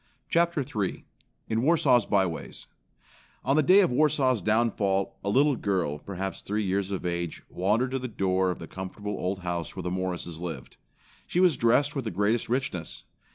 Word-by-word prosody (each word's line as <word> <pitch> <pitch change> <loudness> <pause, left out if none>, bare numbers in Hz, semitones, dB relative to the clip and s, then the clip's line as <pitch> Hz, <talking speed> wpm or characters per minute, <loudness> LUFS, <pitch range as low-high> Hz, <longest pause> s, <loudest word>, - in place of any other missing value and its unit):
Chapter 170 -2 +2
III 105 -7 -3 0.4
In 110 0 0
Warsaw's 130 -6 +4
By 100 -2 +3
ways 85 -3 -6 0.8
On 135 - +3
the 155 - +5
day 185 +8 +6
of 185 - +2
Warsaw's 135 -4 +2
downfall, 105 -2 +1
a 100 - -1
little 140 +6 +4
girl, 90 -9 -1
perhaps 95 +2 -5
three 105 +1 -2
years 95 0 0
of 95 -2 -4
age, 85 -1 -3
wandered 110 +8 +1
to 135 - -1
the 130 - -4
door 95 -4 +1
of 90 - -2
the 85 - -8
comfortable 95 +4 -6
old 95 +1 -3
house 85 -2 -3
where - - -5
the 90 - -2
Morrises 90 -3 -3
lived. 85 -2 -7 0.5
She 175 - 0
was 180 -5 +5
dressed 140 +6 +2
with 135 -4 -3
the - - -1
greatest 105 +3 0
richness. 125 -10 -3
105 Hz, 180 wpm, -27 LUFS, 95-130 Hz, 0.8 s, day